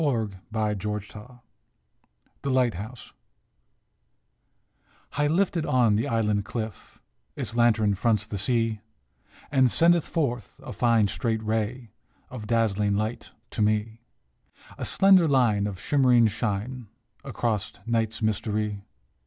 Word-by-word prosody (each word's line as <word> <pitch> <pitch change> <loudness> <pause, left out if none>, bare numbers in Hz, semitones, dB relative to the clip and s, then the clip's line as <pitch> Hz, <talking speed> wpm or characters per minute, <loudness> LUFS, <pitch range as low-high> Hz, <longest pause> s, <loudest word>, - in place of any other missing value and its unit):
THE 155 - +2
LIGHTHOUSE 105 -2 -3
113 125 +4 -12 1.0
THE 140 - -3
LIGHTHOUSE 125 -3 -1 2.0
HIGH 145 +1 0
lifted 170 +1 +1
on 120 -7 +3
the 110 - 0
island 105 -3 +1
cliff 110 -2 -7 0.4
Its 115 - -5
lantern 110 -3 +3
fronts 105 +1 +1
the 105 -2 -5
sea, 115 0 0 0.7
And 130 -3 +4
sendeth 170 +4 +3
forth 125 -9 -2
a - - -7
fine, 115 -4 +3
straight 110 +2 -2
ray 110 +2 -2 0.4
Of 115 -4 -7
dazzling 105 -3 +1
light 110 +3 -3 0.2
to - - -3
me 110 +2 0 0.7
A - - -5
slender 190 -3 +5
line 115 -8 +2
of 95 -3 -6
shimmering 125 -3 +4
shine 110 +3 -2 0.4
Across 115 -6 -2
night's 115 -1 -1
mystery. 105 -1 -1
110 Hz, 115 wpm, -26 LUFS, 105-125 Hz, 2.0 s, slender